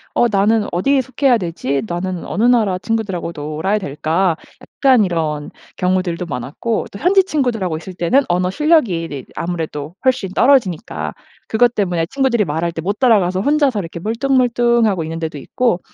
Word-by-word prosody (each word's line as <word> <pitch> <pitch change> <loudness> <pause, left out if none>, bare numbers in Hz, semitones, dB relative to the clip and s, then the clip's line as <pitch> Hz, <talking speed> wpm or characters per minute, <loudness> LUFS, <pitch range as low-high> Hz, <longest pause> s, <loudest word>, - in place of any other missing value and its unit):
'어 240 - +4
나는 210 +1 +2
어디에 265 +11 +2
속해야 260 -1 +2
되지? 165 -6 -2
나는 175 0 -4
어느 210 - -2
나라 220 -7 +3
친구들하고 195 -4 -2
놀아야 155 +7 -1
될까?' 165 +1 0 0.3
약간 255 -6 +3
이런 155 -4 -2 0.3
경우들도 180 -1 0
많았고 150 - -3
또 - - -8
현지 380 - +4
친구들하고 235 - -1
있을 185 +3 -9
때는 175 +11 +2
언어 180 +1 +1
실력이 300 - +3 0.2
이 135 -3 -6
아무래도 160 -3 -4
훨씬 255 -7 +1
떨어지니까 235 - +1 0.4
그것 240 +2 +3
때문에 175 -5 0
친구들이 255 -2 +1
말할 165 +2 -2
때 165 -1 -5
못 200 +4 -2
따라가서 195 -7 +3
혼자서 285 -1 +2
이렇게 170 -2 -6
멀뚱멀뚱하고 235 -3 +1
있는데도 160 -1 -4
있고 235 - 0
190 Hz, 385 characters per minute, -18 LUFS, 170-240 Hz, 0.4 s, 어